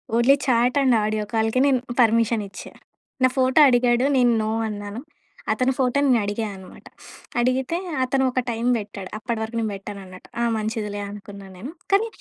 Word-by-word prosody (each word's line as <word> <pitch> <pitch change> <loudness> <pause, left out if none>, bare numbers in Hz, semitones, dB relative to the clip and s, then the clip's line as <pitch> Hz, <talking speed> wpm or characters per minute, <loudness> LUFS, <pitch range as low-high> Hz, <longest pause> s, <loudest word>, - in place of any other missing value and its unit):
Only 240 +4 +5
chat 250 +1 +2
and 260 -3 +4
audio 215 0 -1
కాల్‌కే 225 +2 +1
నేను 270 -3 +3 0.2
permission 230 -1 +3
ఇచ్చా. - - -10 0.5
నా - - +7
ఫోటో 260 +3 +3
అడిగాడు. 245 0 +3
నేను 245 -2 +4
నో 215 - -1 0.2
అన్నాను. 205 +1 -6 0.5
అతని 255 +1 +1
ఫోటో 260 +1 +1
నేనడిగా 220 -4 +1
అనమాట. 190 -1 -13 0.6
అడిగితే 255 +6 0 0.3
అతను 265 +1 +1
ఒక 255 - 0
టైమ్ 230 +1 -2
బెట్టాడు. 205 -3 -7
అప్పటి 225 +1 -3
వరకు 225 +1 -6
నేను 220 -1 -1
బెట్టనన్నట్టు. 195 -2 -10
ఆ - - +2
మంచిదిలే 215 -1 -3
అనుకున్నా 200 -1 -10
నేను. 225 +11 -8 0.2
కానీ 405 +3 +3
230 Hz, 155 wpm, -23 LUFS, 210-255 Hz, 0.6 s, నా